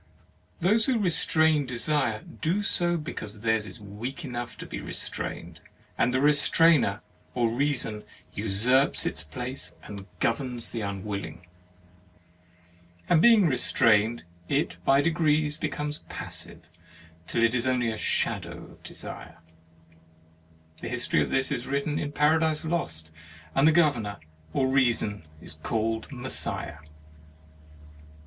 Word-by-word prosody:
Those 215 Hz, +6 st, +4 dB
who 260 Hz, -3 st, +2 dB
restrain 160 Hz, -6 st, +3 dB
desire, 145 Hz, +7 st, 0 dB
do 180 Hz, +3 st, -2 dB
so 175 Hz, -3 st, +2 dB
because 110 Hz, -9 st, -6 dB
theirs 110 Hz, -1 st, +1 dB
is 95 Hz, +5 st, -11 dB
weak 105 Hz, +8 st, -7 dB
enough 120 Hz, -2 st, -5 dB
to -, -, -8 dB
be -, -, -6 dB
restrained; 85 Hz, -3 st, -3 dB, 0.3 s
and 125 Hz, -, +2 dB
the 130 Hz, -, +1 dB
restrainer 150 Hz, -5 st, +4 dB, 0.3 s
or 120 Hz, -2 st, +1 dB
reason 120 Hz, -5 st, -1 dB, 0.3 s
usurps 110 Hz, +7 st, +2 dB
its -, -, -3 dB
place 125 Hz, -, -6 dB
and 100 Hz, -1 st, -9 dB
governs 120 Hz, 0 st, -1 dB
the 115 Hz, -, -4 dB
unwilling. 100 Hz, -3 st, -5 dB, 1.6 s
And 160 Hz, -, +5 dB
being 225 Hz, -3 st, +6 dB
restrained, 115 Hz, -5 st, +3 dB, 0.3 s
it 85 Hz, -, 0 dB
by 135 Hz, +7 st, +4 dB
degrees 155 Hz, -2 st, +2 dB
becomes 150 Hz, -1 st, -3 dB
passive, -, -, -4 dB, 0.6 s
till 115 Hz, -, 0 dB
it 115 Hz, +1 st, +3 dB
is 125 Hz, 0 st, +1 dB
only 125 Hz, -3 st, +1 dB
the 110 Hz, -, -5 dB
shadow -, -, 0 dB
of -, -, -19 dB
desire. -, -, -8 dB, 1.4 s
The -, -, -5 dB
history -, -, +1 dB
of -, -, -1 dB
this 135 Hz, 0 st, +2 dB
is -, -, -3 dB
written 140 Hz, +2 st, -1 dB
in 145 Hz, -, -3 dB
Paradise 155 Hz, +1 st, +2 dB
Lost, 80 Hz, -, -3 dB, 0.4 s
and 135 Hz, +3 st, +4 dB
the -, -, +7 dB
Governor 130 Hz, -11 st, +2 dB, 0.3 s
or 130 Hz, -, +1 dB
Reason 120 Hz, -6 st, +1 dB, 0.2 s
is -, -, -9 dB
called 110 Hz, -, -2 dB
Messiah. 125 Hz, -, -3 dB
130 Hz, 125 wpm, -27 LUFS, 110-150 Hz, 1.6 s, the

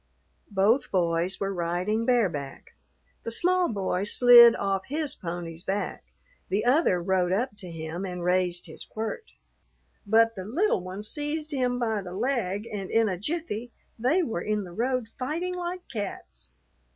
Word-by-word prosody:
Both 215 Hz, +6 st, +2 dB
boys 175 Hz, 0 st, 0 dB
were 195 Hz, 0 st, -1 dB
riding 180 Hz, +6 st, -1 dB
bareback. 175 Hz, -, -1 dB, 0.5 s
The -, -, -5 dB
small 360 Hz, +8 st, +2 dB
boy 190 Hz, -2 st, -1 dB
slid 240 Hz, +1 st, +8 dB
off 195 Hz, -1 st, -1 dB
his 300 Hz, 0 st, -1 dB
pony's 170 Hz, -2 st, -6 dB
back; 195 Hz, +2 st, -3 dB, 0.5 s
the 205 Hz, +4 st, 0 dB
other 250 Hz, -, +3 dB
rode 180 Hz, 0 st, +1 dB
up 240 Hz, +7 st, 0 dB
to 185 Hz, -, -7 dB
him 165 Hz, +2 st, -5 dB
and 180 Hz, -2 st, -5 dB
raised 180 Hz, -1 st, +1 dB
his -, -, -9 dB
quirt, 225 Hz, -, -6 dB, 0.7 s
but 225 Hz, +2 st, +4 dB
the 190 Hz, -, -5 dB
little 310 Hz, -, +1 dB
one 185 Hz, +3 st, -7 dB
seized 300 Hz, +6 st, -3 dB
him 250 Hz, -3 st, 0 dB
by 220 Hz, -4 st, -1 dB
the 180 Hz, -2 st, -8 dB
leg, 220 Hz, -3 st, -1 dB
and 195 Hz, -2 st, -4 dB
in 225 Hz, -1 st, +3 dB
a 185 Hz, -, -1 dB
jiffy 245 Hz, -, -3 dB, 0.3 s
they 290 Hz, +11 st, +2 dB
were 220 Hz, -, -3 dB
in 210 Hz, +1 st, -1 dB
the 175 Hz, -2 st, -10 dB
road 250 Hz, +2 st, -1 dB
fighting 325 Hz, +8 st, -2 dB
like 360 Hz, 0 st, -5 dB
cats. 70 Hz, -, -6 dB
210 Hz, 155 wpm, -27 LUFS, 185-255 Hz, 0.7 s, slid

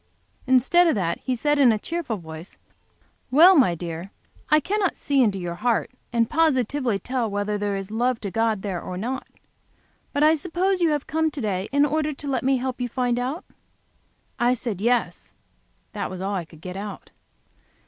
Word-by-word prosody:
Instead 265 Hz, +8 st, +4 dB
of 325 Hz, -, +3 dB
that 175 Hz, -4 st, -1 dB
he 255 Hz, -, -2 dB
said, 295 Hz, +4 st, +1 dB
in 260 Hz, -4 st, +6 dB
a 220 Hz, -, +1 dB
cheerful 300 Hz, -2 st, -3 dB
voice, 160 Hz, 0 st, -10 dB, 0.7 s
"Well, 335 Hz, +9 st, +7 dB
my 245 Hz, -, +4 dB
dear, 170 Hz, +2 st, -6 dB, 0.4 s
I 305 Hz, 0 st, +6 dB
cannot 390 Hz, +3 st, 0 dB
see 280 Hz, -2 st, +1 dB
into 210 Hz, -5 st, +2 dB
your 175 Hz, -2 st, -4 dB
heart 230 Hz, +8 st, 0 dB, 0.2 s
and 230 Hz, -1 st, +2 dB
positively 265 Hz, -6 st, +1 dB
tell 245 Hz, +3 st, -2 dB
whether 205 Hz, +1 st, -2 dB
there 205 Hz, -1 st, -1 dB
is 195 Hz, +1 st, -5 dB
love 240 Hz, +2 st, 0 dB
to 200 Hz, -, -4 dB
God 225 Hz, -2 st, 0 dB
there 190 Hz, -4 st, -3 dB
or 180 Hz, -, -6 dB
not. 250 Hz, +7 st, -4 dB, 0.8 s
But 285 Hz, 0 st, +1 dB
I 310 Hz, +1 st, +6 dB
suppose 360 Hz, +4 st, 0 dB
you 335 Hz, -, +4 dB
have 295 Hz, -2 st, -1 dB
come 320 Hz, 0 st, 0 dB
here 315 Hz, -, +1 dB
to 280 Hz, -, -5 dB
day 195 Hz, -3 st, -2 dB
in 285 Hz, +1 st, +4 dB
order 305 Hz, +1 st, 0 dB
to 290 Hz, -, -7 dB
let 270 Hz, -, 0 dB
me 265 Hz, 0 st, +2 dB
help 255 Hz, 0 st, -4 dB
you 245 Hz, -, 0 dB
to 235 Hz, -, -20 dB
find 245 Hz, -2 st, +1 dB
out?" 265 Hz, +7 st, -3 dB, 0.9 s
I 245 Hz, +1 st, +3 dB
said, 225 Hz, -5 st, -4 dB
"Yes"; 240 Hz, +2 st, -1 dB, 0.6 s
that 205 Hz, -3 st, -4 dB
was 185 Hz, 0 st, -7 dB
all 195 Hz, +2 st, -2 dB
I 180 Hz, -4 st, -2 dB
could 160 Hz, -1 st, -17 dB
get 180 Hz, +1 st, -7 dB
out. 205 Hz, +1 st, -7 dB
245 Hz, 200 wpm, -24 LUFS, 200-290 Hz, 0.9 s, Well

